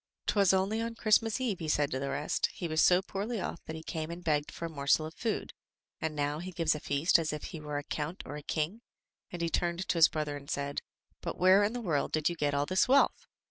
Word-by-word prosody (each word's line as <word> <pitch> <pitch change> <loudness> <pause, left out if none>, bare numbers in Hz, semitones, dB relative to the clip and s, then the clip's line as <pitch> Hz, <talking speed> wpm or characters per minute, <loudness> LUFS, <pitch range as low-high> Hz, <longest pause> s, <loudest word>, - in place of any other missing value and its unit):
*"Twas 200 -3 +4
only 195 +4 +1
on 230 0 -3
Christmas 225 0 +3
eve," 230 -8 -1
he 160 - -4
said 145 -1 +1
to 130 - -1
the 140 +1 -2
rest, 150 - 0
"he 175 - -4
was 160 0 +2
so 180 +1 +5
poorly 205 +4 -3
off 170 - -5
that 160 - -5
he 160 - -8
came 160 -1 -4
and 170 +1 -7
begged 150 -2 0
for 170 - -6
a - - -1
morsel 150 0 +1
of 160 - -7
food, 225 +4 -3 0.5
and 160 -1 -2
now 145 +1 -1
he 185 +2 -6
gives 165 -3 +1
a 150 - -4
feast 145 +5 +3
as 160 -2 -1
if 150 -1 -5
he 165 - -6
were 150 -1 -4
a 145 - -3
count 155 +5 -4
or 145 - -6
a 150 - -6
king," 160 +9 -2 0.5
and 175 -1 -4
he 165 - +1
turned 175 +3 -1
to - - 0
his 160 - +9
brother 150 -2 -2
and 140 0 -9
said, 140 -2 -2 0.4
"But - - -4
where 185 +2 +6
in 210 +3 +1
the 245 - -3
world 160 -9 -1
did 155 0 +2
you 175 - -3
get 145 -3 0
all 140 0 +1
this 185 +4 +2
wealth?" 275 +2 +3
165 Hz, 260 wpm, -31 LUFS, 150-190 Hz, 0.5 s, his